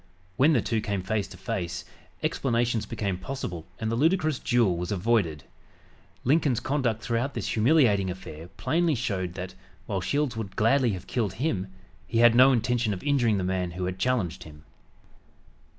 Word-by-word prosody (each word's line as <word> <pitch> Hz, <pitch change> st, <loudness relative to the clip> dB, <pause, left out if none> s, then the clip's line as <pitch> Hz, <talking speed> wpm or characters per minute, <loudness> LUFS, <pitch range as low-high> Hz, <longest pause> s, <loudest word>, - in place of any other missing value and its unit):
When 145 Hz, +8 st, +4 dB
the 120 Hz, -, +2 dB
two 115 Hz, -2 st, 0 dB
came 100 Hz, -3 st, -2 dB
face 105 Hz, 0 st, -1 dB
to 95 Hz, -1 st, -12 dB
face, 90 Hz, -1 st, -4 dB, 0.4 s
explanations 120 Hz, -3 st, 0 dB
became 100 Hz, -4 st, -3 dB
possible 95 Hz, -7 st, -5 dB
and 110 Hz, -1 st, -2 dB
the -, -, 0 dB
ludicrous 155 Hz, +1 st, +2 dB
duel 115 Hz, -7 st, +2 dB
was 90 Hz, +2 st, -4 dB
avoided. 95 Hz, -, +1 dB, 0.8 s
Lincoln's 135 Hz, -3 st, +2 dB
conduct 125 Hz, -4 st, -1 dB
throughout 120 Hz, +4 st, -1 dB
this -, -, -3 dB
humiliating 110 Hz, -6 st, +3 dB
affair 85 Hz, -3 st, -8 dB
plainly 160 Hz, +3 st, +1 dB
showed 95 Hz, -7 st, -2 dB
that, 90 Hz, 0 st, -6 dB, 0.3 s
while 95 Hz, -, -2 dB
Shields 140 Hz, +5 st, 0 dB
would 105 Hz, -4 st, -5 dB
gladly 120 Hz, +1 st, +3 dB
have 90 Hz, -, -6 dB
killed 110 Hz, -7 st, -1 dB
him, 105 Hz, -, -1 dB, 0.4 s
he 115 Hz, -, -2 dB
had 120 Hz, 0 st, +7 dB
no 130 Hz, +3 st, +7 dB
intention 120 Hz, -3 st, +1 dB
of 90 Hz, -, -9 dB
injuring 125 Hz, -7 st, +2 dB
the 95 Hz, -, -1 dB
man 90 Hz, -1 st, -1 dB
who 90 Hz, -, -2 dB
had 90 Hz, +1 st, -4 dB
challenged 115 Hz, -7 st, 0 dB
him. 75 Hz, -1 st, -12 dB
110 Hz, 165 wpm, -27 LUFS, 95-125 Hz, 0.8 s, had